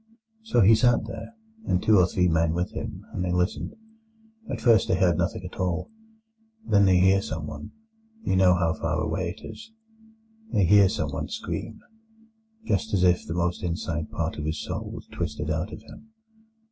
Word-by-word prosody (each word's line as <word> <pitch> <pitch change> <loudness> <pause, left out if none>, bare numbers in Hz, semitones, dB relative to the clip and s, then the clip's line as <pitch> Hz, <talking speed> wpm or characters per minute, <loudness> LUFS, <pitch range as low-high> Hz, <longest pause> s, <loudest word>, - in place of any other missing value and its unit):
"So 220 - +2
he 105 +3 +7
sat 115 0 +3
there, 115 - -8 0.3
and 90 - +2
two 110 -3 +5
or 90 - +5
three 90 0 +1
men 80 -1 +2
with 90 +1 -1
him, - - -6
and 90 - -2
they 90 - -1
listened. 90 +2 -1 0.7
At - - -3
first 115 -5 +4
they 95 - +2
hear 90 -3 +3
nothing - - -2
at - - -10
all; 90 - -2 0.7
then 100 - +4
they 95 -1 +5
hear 95 +2 +4
someone—you 220 - -6
know 95 -1 +5
how 85 -2 +1
far 80 0 -2
away 85 +3 -2
it - - -12
is—they 225 - -6
hear 100 +1 +6
someone - - -3
scream, - - -5 0.8
just 105 - 0
as 90 - +2
if 90 -1 +3
the 80 - -3
most 85 0 -1
inside 85 -3 -3
part 80 -1 -3
of 75 - -4
his 75 0 -3
soul - - -5
was - - -8
twisted 75 -2 -3
out 80 +7 -2
of 110 - -9
him. 220 - -14
90 Hz, 175 wpm, -26 LUFS, 85-115 Hz, 0.8 s, he